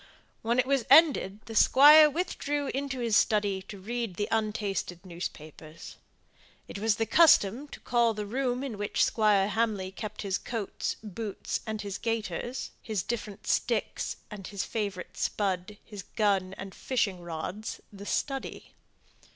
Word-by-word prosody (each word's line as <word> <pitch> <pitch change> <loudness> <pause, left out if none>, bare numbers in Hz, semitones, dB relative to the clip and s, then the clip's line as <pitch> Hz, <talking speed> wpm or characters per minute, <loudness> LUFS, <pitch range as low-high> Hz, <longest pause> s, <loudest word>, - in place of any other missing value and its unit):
When 235 +2 0
it 255 - +3
was 275 -2 +1
ended 270 - +5
the 225 - -8
Squire 295 +7 +8
withdrew 290 -3 -2
into 275 -2 -3
his 230 -3 +1
study 205 -2 +2
to 200 - -8
read 230 -1 -4
the 205 +3 -2
untasted 210 -4 -2
newspapers. 160 -3 -8 0.7
It - - -7
was 220 0 +2
the 225 - 0
custom 280 - +5
to - - -11
call 235 -2 +2
the 210 0 -4
room 250 +3 -1
in 235 -7 -5
which 205 - +1
Squire 210 -3 +3
Hamley 210 -4 -1
kept 210 +3 -6
his 195 -1 -1
coats, 225 -4 -4
boots, 210 0 -4
and 215 -1 -4 0.2
gaiters, 225 +1 -3
his 210 -6 -2
different 215 -4 -5
sticks - - -1 0.2
and 200 -3 -8
favourite 200 -2 -4
spud, 195 0 -2
his 205 -3 -8
gun 195 -2 0
and 195 0 -8
fishing 200 -8 -1
rods, 175 +5 -5
"the 200 0 -10
study." 270 -2 -3
215 Hz, 145 wpm, -29 LUFS, 195-240 Hz, 0.7 s, Squire